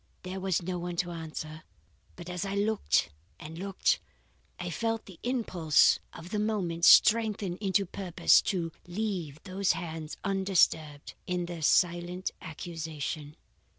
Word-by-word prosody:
There 185 +1 -5
was 190 -2 0
no 180 0 -3
one 175 0 -4
to 175 +1 -1
answer; 155 -1 -6 0.5
but 175 -1 -10
as 180 -1 -3
I 195 0 -3
looked 205 - +1 0.3
and 160 +1 -8
looked, 195 0 +1 0.6
I 175 -1 -4
felt 225 +4 -2
the 185 -4 -13
impulse 185 - +3
of 170 +3 -11
the 210 - 0
moment 185 -6 0
strengthen 215 -5 +5
into 195 0 +1
purpose 180 -1 +3
to 170 -4 -1 0.2
leave 175 -6 -3
those 190 0 +1
hands 160 -2 -6
undisturbed 185 -6 +1
in 180 -1 -1
their 170 -1 -6
silent 175 +3 +2
accusation. 155 -2 -5
180 Hz, 135 wpm, -29 LUFS, 165-195 Hz, 0.6 s, strengthen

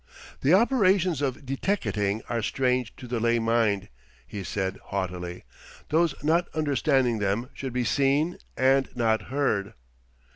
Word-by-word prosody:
"The 150 +7 +4
operations 190 - +3
of 140 0 -2
deteckating 110 - -1
are 115 -1 -1
strange 125 +1 0
to 125 - -10
the 120 -1 -2
lay 115 +1 +2
mind," 115 -4 +1 0.4
he 100 -2 -6
said 95 +1 -2
haughtily. 90 -2 -4 0.5
"Those 160 -1 +2
not 170 +3 +2
understanding 135 -5 +1
them 105 +6 -1
should 135 -1 -5
be 125 0 0
seen 140 +7 +1 0.2
and 135 +1 +3
not 115 -2 +2
heard." 120 -8 -1
125 Hz, 135 wpm, -26 LUFS, 105-145 Hz, 0.5 s, The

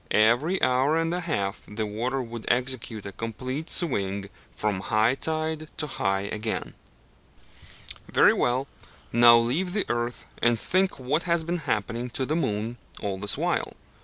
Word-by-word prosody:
Every 120 - +3
hour 130 +5 +3
and 165 +1 0
a 180 - 0
half 100 - -2
the 110 +1 -3
water 120 +6 -2
would 115 -1 -7
execute 125 -4 -1
a 100 - -5
complete 130 - -5
swing 100 - 0 0.2
from 105 -3 -1
high 110 +4 +2
tide 155 +2 -1
to 155 - -1
high 95 -8 -1
again. 105 +2 -3 1.4
Very - - +6
well, 130 +3 +1 0.5
now 120 0 +8
leave 145 +11 +1
the 205 - +1
earth, 120 0 -2 0.2
and 120 -1 +3
think 185 - +1
what 135 +5 0
has 170 -1 +2
been 170 +2 -1
happening 115 +3 -1
to 130 - 0
the 155 - 0
moon 115 -6 -1 0.2
all 95 -2 -3
this 105 +1 +2
while. - - -1
120 Hz, 155 wpm, -26 LUFS, 110-155 Hz, 1.4 s, now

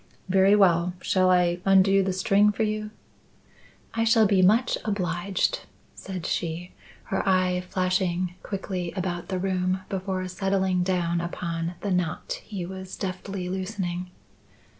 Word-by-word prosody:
"Very 190 +2 +5
well. 180 -3 +4
Shall 185 0 +2
I 180 -1 +3
undo 195 0 +5
the 190 0 0
string 200 +2 +3
for 215 +2 -1
you?" 215 0 -2 1.0
"I 225 - +1
shall 225 -1 +5
be 195 -2 +3
much 220 +7 +4
obliged," 185 -2 -1 0.3
said 185 -4 -7
she, 170 +1 -3 0.3
her 190 - -1
eye 185 -1 +2
flashing 185 -1 0
quickly 185 -3 -4
about 180 -2 -3
the 190 - -1
room 185 0 0
before 190 -1 -2
settling 190 0 0
down 175 -2 0
upon 170 0 -3
the 200 - -2
knot 180 -3 -2
he 195 -5 -5
was 190 +1 -7
deftly 190 -1 -4
loosening. 185 -1 -3
185 Hz, 135 wpm, -26 LUFS, 180-195 Hz, 1.0 s, Very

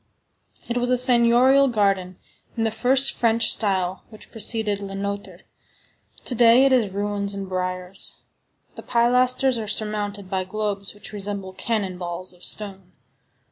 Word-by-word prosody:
It 240 - -2
was 245 0 -1
a 250 - +3
seignorial 250 +2 +5
garden 195 -6 0 0.4
in 225 - 0
the 225 - 0
first 260 +4 +2
French 230 -1 +2
style 190 -3 -1
which 215 -2 -14
preceded 215 -2 0
Le 195 -1 -6
Nôtre; 200 +1 -5 0.8
to - - -1
day 240 +2 +6
it 270 - +3
is 235 -7 +2
ruins 200 0 -2
and 195 -1 -5
briars. 185 0 -2 0.5
The - - -9
pilasters 250 +1 +2
are 215 - -5
surmounted 205 -2 -2
by 190 -1 -2
globes 200 0 -4
which 205 - -10
resemble 200 -2 -4
cannon 195 -4 -2
balls 175 +1 -6
of 180 - -17
stone. 195 -3 -5
205 Hz, 145 wpm, -23 LUFS, 195-235 Hz, 0.8 s, day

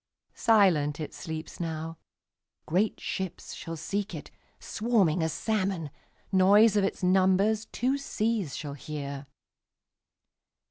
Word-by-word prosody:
Silent 170 -10 +3
it 155 - -5
sleeps 160 -1 -7
now; 165 -1 -4 0.7
Great 190 +7 +1
ships 190 -2 -5
shall 165 0 -6
seek 200 +6 -3
it, - - -9 0.3
Swarming 210 -8 +1
as 160 0 0
salmon; 190 -8 -1 0.4
Noise 200 +3 +6
of 205 - +3
its 195 - -2
numbersTwo 200 +8 +2
seas 215 - -1
shall 145 -2 -5
hear. 140 -1 -6
185 Hz, 105 wpm, -28 LUFS, 160-210 Hz, 0.7 s, Noise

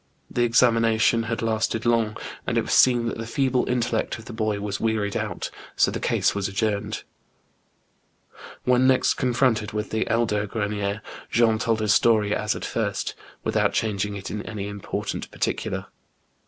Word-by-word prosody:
The 120 - 0
examination 115 -1 +4
had 115 0 -3
lasted 115 0 0
long, 115 -2 +2 0.3
and - - 0
it - - +4
was - - -2
soon 120 -2 +5
that 115 - -3
the 115 - -5
feeble 130 0 +1
intellect 120 -2 0
of 110 - -12
the 120 - -8
boy 110 -2 -1
was 100 -1 -3
wearied 110 -3 0
out, - - -3 0.2
so - - +3
the - - -3
case - - +1
was 100 -1 -1
adjourned. 105 +1 -2 1.6
When 125 +1 +4
next 130 -1 +4
confronted 120 -4 +1
with 105 -1 -3
the 110 - 0
elder 110 -2 +1
Grcnicr, 105 -1 -2 0.3
Jean 115 -1 +3
told 115 -2 0
his 105 -1 +3
story 105 -3 +3
as 105 0 0
at - - -5
first, 100 -4 -2 0.3
with - - -2
out - - +3
changing 105 -2 -1
it 95 -1 -6
in 105 - -3
any 100 -2 -5
important 100 -1 -4
particular. - - -2
110 Hz, 170 wpm, -24 LUFS, 105-115 Hz, 1.6 s, soon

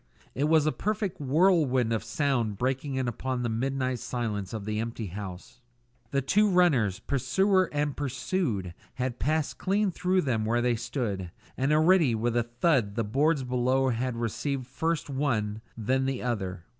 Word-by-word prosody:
It 140 - 0
was 155 -1 +4
a 155 - +3
perfect 200 -3 -2
whirlwind 140 -5 +3
of 110 -1 -1
sound 120 -4 0
breaking 135 +3 -1
in 130 -1 -1
upon 125 +1 -2
the 120 - 0
midnight 130 +2 -1
silence 105 -7 -3
of 110 -3 -5
the 105 0 -2
empty 115 0 -4
building. 95 -3 -6 0.7
The 140 +1 0
two 210 +9 +3
runners, 145 - +3
pursuer 185 - +1
and 145 -1 -1
pursued, 130 - -2 0.2
had 125 -1 -3
passed 155 0 0
clean 200 +1 +1
through 185 +2 +1
them 120 -6 0
where 115 +2 +1
they 120 0 +2
stood, 115 -6 -3 0.3
and 135 +3 0
already 155 -4 +4
with 115 +2 -1
a 120 - +4
thud 120 -2 +1
the 115 - 0
boards 140 +7 +1
below 130 +1 +1
had 125 +1 -1
received 125 +4 -2
first 160 +5 -2
one, 115 -7 -1 0.2
then 130 +4 +1
the 135 -2 -2
other. 95 -8 -3
130 Hz, 165 wpm, -28 LUFS, 115-150 Hz, 0.7 s, was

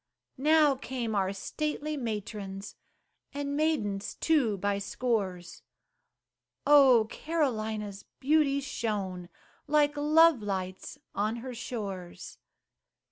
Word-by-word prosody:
Now 300 0 +5
came 255 -4 -4
our 195 -2 +1
stately 300 +8 -3
matrons, 210 -5 -5 0.6
And 285 0 -2
maidens 220 -11 -1
too 265 -11 +2
by 200 +1 0
scores; 200 -5 -2 1.0
Oh! 270 -6 +7
Carolina's 220 -10 -2
beauty 280 0 +2
shone 195 -9 -3 0.4
Like 295 0 +3
love 305 -1 +5
lights 190 -2 -4 0.2
on 215 +3 0
her 255 - -5
shores. 200 -7 -6
230 Hz, 90 wpm, -29 LUFS, 200-290 Hz, 1.0 s, Oh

